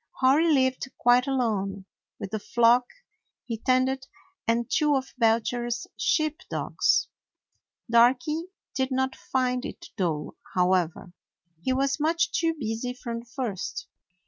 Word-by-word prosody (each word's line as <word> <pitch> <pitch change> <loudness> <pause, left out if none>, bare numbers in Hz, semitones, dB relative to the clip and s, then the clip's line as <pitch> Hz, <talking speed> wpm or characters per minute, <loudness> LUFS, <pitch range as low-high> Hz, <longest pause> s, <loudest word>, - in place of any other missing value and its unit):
Hori 290 +6 +4
lived 260 -2 +2
quite 245 +2 +4
alone 200 -7 -1 0.3
with 195 - -6
the 215 - -2
flock 240 +3 +3 0.6
he 230 -3 -4
tended 255 +1 +1 0.4
and 230 0 +1
two 300 -2 +2
of 265 -1 -3
Belcher's 235 +1 +1
sheep 310 -1 +1
dogs. - - +1 0.8
Darky 250 +8 +3 0.3
did 260 -1 0
not 265 0 0
find 250 -1 -1
it - - -8
dull, 165 -6 -2 0.2
however; 180 -1 +1 0.5
he 260 - 0
was 270 +2 +1
much 330 +3 +1
too 330 0 +1
busy 230 +1 -3
from 235 -2 -5
the 235 - -13
first. 210 - -4
250 Hz, 125 wpm, -26 LUFS, 225-265 Hz, 0.8 s, Hori